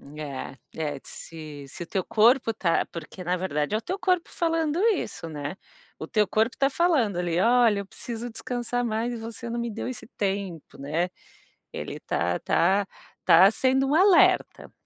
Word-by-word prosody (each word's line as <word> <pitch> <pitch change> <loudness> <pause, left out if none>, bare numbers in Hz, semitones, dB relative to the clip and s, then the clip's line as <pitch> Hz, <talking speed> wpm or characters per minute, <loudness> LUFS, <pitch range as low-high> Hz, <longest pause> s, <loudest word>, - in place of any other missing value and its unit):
É, 135 -3 -6 0.4
é - - -8
se 155 -3 -9
se 175 - -7
o - - -9
teu 190 -2 -1
corpo 230 +2 +4
está 175 -6 +1
porque, 175 +2 -9
na 180 +1 0
verdade 150 0 -1
é - - +3
o 220 - -5
teu 375 - -4
corpo, 365 -2 +1
falando 330 -1 0 0.2
isso, 165 - -5
né, 145 +1 -5 0.4
o - - -6
teu 210 -3 +2
corpo 220 +5 +1
está 275 - +2
falando 275 - +2
ali, 175 -1 0
"Olha, 230 -1 +4
eu 200 - -5
preciso 235 +4 -6
descansar 245 +1 -3
mais, 235 +1 -1
e - - -4
você 230 +1 -7
não 235 +1 -3
me 235 - -2
deu 220 - -5
esse 240 -4 -6
tempo," 195 -5 -3
né, 160 +6 -1 0.6
ele - - -6
está 90 +1 -1
está 195 +3 +2 0.3
está 190 +5 +7
sendo 265 +2 +2
um 285 - +1
alerta. 370 0 +4
215 Hz, 180 wpm, -26 LUFS, 175-245 Hz, 0.6 s, está